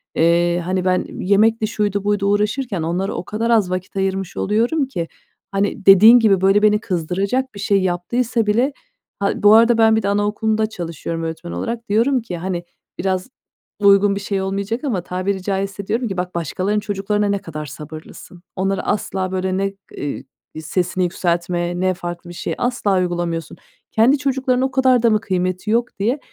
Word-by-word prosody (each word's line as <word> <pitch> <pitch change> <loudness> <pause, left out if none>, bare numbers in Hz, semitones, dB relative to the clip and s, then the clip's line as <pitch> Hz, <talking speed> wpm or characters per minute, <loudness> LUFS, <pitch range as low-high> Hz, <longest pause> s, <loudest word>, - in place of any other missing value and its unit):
Eee, 170 +1 +3
hani 185 0 -1
ben 185 0 +1 0.2
yemekti 215 +3 +3
şuydu 205 -2 -1
buydu 205 -1 0
uğraşırken 210 -1 0
onlara 175 +4 -2
o 175 - -5
kadar 225 +2 -2
az 215 -6 +3
vakit 185 +1 -4
ayırmış 195 -1 -2
oluyorum 240 +8 +1
ki, 170 -10 -4 0.4
hani 200 0 -1
dediğin 215 +5 +9
gibi 200 -4 +3
böyle 195 +2 +4
beni 210 0 +4
kızdıracak 195 +8 -2
bir - - -8
şey 200 -1 +2
yaptıysa 220 +6 0
bile 240 +7 +1 0.5
Ha, 200 - +1
bu 205 +1 +8
arada 230 +1 +5
ben 220 -1 +5
bir 220 - +1
de - - 0
anaokulunda 215 +1 0
çalışıyorum 165 -3 -5
öğretmen 165 +1 -5
olarak. 230 -1 -4
Diyorum 240 +4 +2
ki, 180 -6 -6
hani, 175 0 -3 0.4
biraz 185 +4 -1 0.5
uygun 200 0 +5
bir - - -3
şey 195 -1 -2
olmayacak 200 +6 -3
ama 220 -11 -1
tabiri 185 +1 -2
caizse 195 0 -3
diyorum 235 +1 -1
ki 190 -3 -5
"Bak 180 0 -3
başkalarının 185 +5 -1
çocuklarına 205 +1 -1
ne 200 0 0
kadar 155 -5 -7
sabırlısın. 155 +4 -11
Onları 195 +1 -1
asla 190 -2 -2
böyle 185 0 -1
ne, 195 0 -1 0.2
iii, 145 -1 -4 0.4
sesini 180 +3 -1
yükseltme, 175 0 -1
ne 185 0 +1
farklı 175 -1 -7
bir 175 - -9
şey - - -3
asla 215 -6 0
uygulamıyorsun. 175 -2 -3 0.3
Kendi 245 +6 +4
çocuklarının 265 -2 0
o 265 - -3
kadar 255 -2 +3
da 230 - +5
mı 215 0 +2
kıymeti 185 +1 -2
yok?" 235 -2 0
diye 240 +8 0
195 Hz, 175 wpm, -20 LUFS, 180-220 Hz, 0.5 s, dediğin